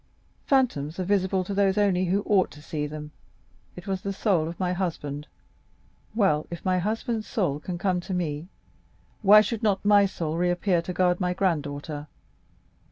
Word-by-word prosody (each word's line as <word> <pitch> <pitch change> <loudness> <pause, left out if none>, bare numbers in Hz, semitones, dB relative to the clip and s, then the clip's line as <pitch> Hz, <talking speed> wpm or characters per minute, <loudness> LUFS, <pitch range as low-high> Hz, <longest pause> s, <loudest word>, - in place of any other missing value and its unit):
"Phantoms 190 - +1
are - - 0
visible 190 0 +1
to 200 - -5
those 195 0 +2
only 190 -3 +2
who 195 +3 +1
ought 195 -3 +3
to 150 - -13
see 150 -2 -3
them. 150 0 -8 0.6
It 180 - -10
was 190 -1 -2
the 200 - -3
soul 190 -5 +1
of 170 - -7
my 180 -1 0
husband!—Well, 155 +1 -4
if 170 +2 -8
my 185 -1 +2
husband's 220 +3 -2
soul 175 - -1
can 175 +3 -5
come 180 0 0
to 180 +2 -5
me, 160 -2 -3 0.7
why 210 0 +8
should 220 0 -3
not 205 -3 +1
my 205 -1 +6
soul 165 -4 -3
reappear 175 0 +1
to 170 - -5
guard 180 -1 +2
my 180 -1 0
granddaughter? 150 -4 -2
180 Hz, 165 wpm, -26 LUFS, 160-200 Hz, 0.7 s, why